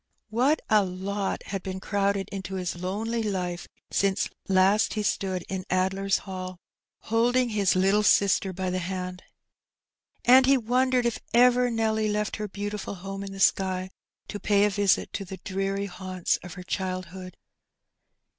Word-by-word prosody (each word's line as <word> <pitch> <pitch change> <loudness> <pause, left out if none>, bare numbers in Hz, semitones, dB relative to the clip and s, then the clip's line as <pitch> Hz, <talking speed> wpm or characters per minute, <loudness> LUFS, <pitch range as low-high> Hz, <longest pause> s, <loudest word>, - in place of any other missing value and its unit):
What 260 +7 +2
a 215 -2 +4
lot 195 +2 -3
had 195 -1 -4
been 190 0 -5
crowded 200 0 0
into 190 -1 -5
his 180 -2 -3
lonely 210 +6 -2
life 180 -5 -3 0.2
since 195 0 +1 0.2
last 195 +3 +3
he 215 - -1
stood 190 -3 -1
in 190 -1 -4
Addler's 190 +1 +1
Hall^ 185 -2 -6 0.4
holding 240 +2 +2
his 205 -4 +2
little 195 +3 +3
sister 200 -2 +3
by 185 0 -3
the 185 - -1
hand! 180 0 -4 1.0
And 255 +2 +7
he 275 0 +6
wondered 250 +1 +1
if 235 - 0 0.2
ever 250 +1 +5
Nelly 220 -2 0
left 210 0 -1
her 210 -1 -3
beautiful 205 0 -5
home 195 +2 -6
in 195 - -6
the 195 - -8
sky 185 -1 +2 0.4
to 205 - -6
pay 205 +1 +3
a 210 - +1
visit 200 -1 +1
to 200 - -3
the 190 0 -8
dreary 195 +1 -2
haunts 185 -2 -2
of 180 -2 -10
her 180 - -8
childhood. 185 0 -5
195 Hz, 155 wpm, -26 LUFS, 185-210 Hz, 1.0 s, And